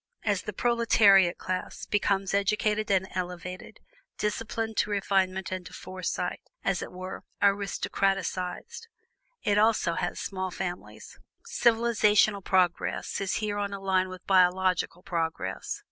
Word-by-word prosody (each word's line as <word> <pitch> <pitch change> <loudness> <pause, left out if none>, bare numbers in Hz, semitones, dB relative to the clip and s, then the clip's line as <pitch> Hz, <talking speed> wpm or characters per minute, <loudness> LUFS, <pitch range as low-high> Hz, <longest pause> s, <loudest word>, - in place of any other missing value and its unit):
As 205 -3 +1
the - - -5
proletariat 205 -5 +4
class 185 0 -4
becomes 195 -2 0
educated 210 +2 +1
and 190 -1 +2
elevated, 180 0 -6 0.4
disciplined 225 +1 -2
to - - +2
refinement 190 -2 0
and 185 -1 -3
to - - -13
foresight 185 -1 -4 0.2
as 195 -3 0
it - - -6
were 185 +1 -7 0.2
aristocratised 195 - -1 0.6
it 205 0 +3
also 215 -6 +3
has 175 - -2
small 185 -1 -3
families. 180 -1 -7 0.3
Civilizational 225 - +3
progress 180 +1 0
is 195 - -1
here 210 -1 -2
on 200 -1 -2
a 200 - -5
line 190 -1 +1
with 185 -1 -10
biological 185 -1 +2
progress. 160 - -3
195 Hz, 125 wpm, -28 LUFS, 185-210 Hz, 0.6 s, proletariat